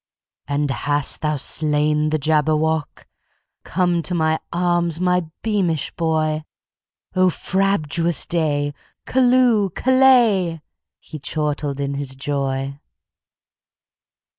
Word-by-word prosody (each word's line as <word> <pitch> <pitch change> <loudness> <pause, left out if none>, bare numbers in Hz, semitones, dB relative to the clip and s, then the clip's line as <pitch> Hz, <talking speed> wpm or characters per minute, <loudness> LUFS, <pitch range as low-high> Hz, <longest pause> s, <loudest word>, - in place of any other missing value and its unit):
"And 145 0 -1
hast 145 +1 -1
thou 150 -1 0
slain 150 +1 +1
the 155 - +1
Jabberwock? 155 +1 0 0.6
Come 175 -1 0
to 180 +2 -2
my 160 -1 +1
arms, 175 -1 0
my 180 -2 +1 0.2
beamish 180 -9 0
boy!O 160 +3 -2
frabjous 175 -4 0
day! 145 -4 0 0.3
Callooh! 250 -5 +3
Callay!"He 185 - +1
chortled 145 -1 -3
in 140 0 -2
his 140 -1 -4
joy. 135 0 -3
155 Hz, 90 wpm, -21 LUFS, 145-180 Hz, 0.6 s, Callooh